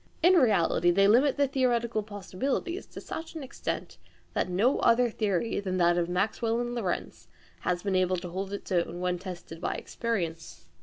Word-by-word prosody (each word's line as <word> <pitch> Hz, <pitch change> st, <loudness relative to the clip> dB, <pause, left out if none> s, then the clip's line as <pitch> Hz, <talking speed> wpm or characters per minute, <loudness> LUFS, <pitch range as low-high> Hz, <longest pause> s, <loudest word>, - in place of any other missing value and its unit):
In 355 Hz, +2 st, +7 dB
reality 205 Hz, -, +4 dB
they 195 Hz, +3 st, +5 dB
limit 255 Hz, +7 st, +4 dB
the 285 Hz, -1 st, +3 dB
theoretical 240 Hz, -4 st, +1 dB
possibilities 215 Hz, -, -3 dB
to -, -, -9 dB
such 325 Hz, +1 st, -7 dB
an 315 Hz, -, -5 dB
extent, 260 Hz, -, -5 dB, 0.3 s
that -, -, 0 dB
no 210 Hz, +9 st, +2 dB
other 235 Hz, 0 st, +4 dB
theory 210 Hz, -1 st, 0 dB
than 185 Hz, -2 st, -2 dB
that 175 Hz, -1 st, +4 dB
of 175 Hz, 0 st, 0 dB
Maxwell 220 Hz, +5 st, 0 dB
and 240 Hz, 0 st, -2 dB
Lorentz 205 Hz, -8 st, -3 dB, 0.3 s
has 180 Hz, 0 st, -1 dB
been 200 Hz, -2 st, 0 dB
able 185 Hz, 0 st, +2 dB
to 175 Hz, 0 st, -6 dB
hold 190 Hz, +3 st, -4 dB
its 200 Hz, 0 st, -6 dB
own 175 Hz, -1 st, 0 dB
when 180 Hz, 0 st, -1 dB
tested 175 Hz, -3 st, -8 dB
by -, -, -1 dB
experience. 165 Hz, -, -4 dB
200 Hz, 175 wpm, -28 LUFS, 180-240 Hz, 0.3 s, In